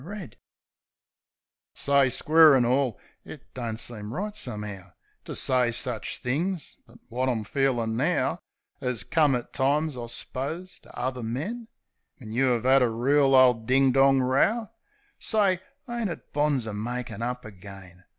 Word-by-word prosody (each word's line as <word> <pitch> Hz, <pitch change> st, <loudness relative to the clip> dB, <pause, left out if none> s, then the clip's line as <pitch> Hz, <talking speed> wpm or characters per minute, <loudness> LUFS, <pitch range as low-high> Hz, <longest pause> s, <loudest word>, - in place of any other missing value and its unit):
THE -, -, -12 dB
SIREN 195 Hz, -, -7 dB
S9 -, -, -22 dB, 1.4 s
Say, 140 Hz, -2 st, +3 dB
square 155 Hz, +3 st, +6 dB
an' 125 Hz, -2 st, +3 dB
all 125 Hz, -2 st, +1 dB
— -, -, -40 dB
It -, -, -12 dB
don't 115 Hz, -3 st, -4 dB
seem 110 Hz, -2 st, -7 dB
right, 205 Hz, -, -4 dB
some'ow, 105 Hz, -, -7 dB, 0.3 s
To -, -, -6 dB
say 125 Hz, -2 st, +2 dB
such 120 Hz, -1 st, -3 dB
things; 160 Hz, +6 st, -2 dB
but -, -, -17 dB
wot 130 Hz, +2 st, 0 dB
I'm 115 Hz, -4 st, -1 dB
feelin' 120 Hz, -2 st, 0 dB
now -, -, 0 dB, 0.4 s
'As 125 Hz, -5 st, -2 dB
come 150 Hz, 0 st, +2 dB
at 120 Hz, -, -5 dB
times, 145 Hz, +2 st, +1 dB
I 120 Hz, -1 st, -6 dB
s'pose, 155 Hz, +10 st, -5 dB
to -, -, -20 dB
uvver 125 Hz, -1 st, -3 dB
men 180 Hz, -, -4 dB, 0.3 s
— -, -, -53 dB
When 115 Hz, -8 st, -10 dB
you 130 Hz, +3 st, +2 dB
'ave 120 Hz, +1 st, 0 dB
'ad 135 Hz, +1 st, +6 dB
a 125 Hz, -, +3 dB
reel 135 Hz, +4 st, +3 dB
ole 130 Hz, -1 st, +7 dB
ding 130 Hz, +4 st, +2 dB
dong 135 Hz, 0 st, +4 dB
row, 200 Hz, -, +1 dB, 0.5 s
Say, 200 Hz, -5 st, +1 dB, 0.3 s
ain't 235 Hz, -4 st, -2 dB
it 170 Hz, -, -9 dB
bonzer 140 Hz, -7 st, 0 dB
makin' 120 Hz, +2 st, -4 dB
up 125 Hz, 0 st, -3 dB
agen? 95 Hz, -3 st, -12 dB
130 Hz, 160 wpm, -26 LUFS, 115-145 Hz, 1.4 s, ole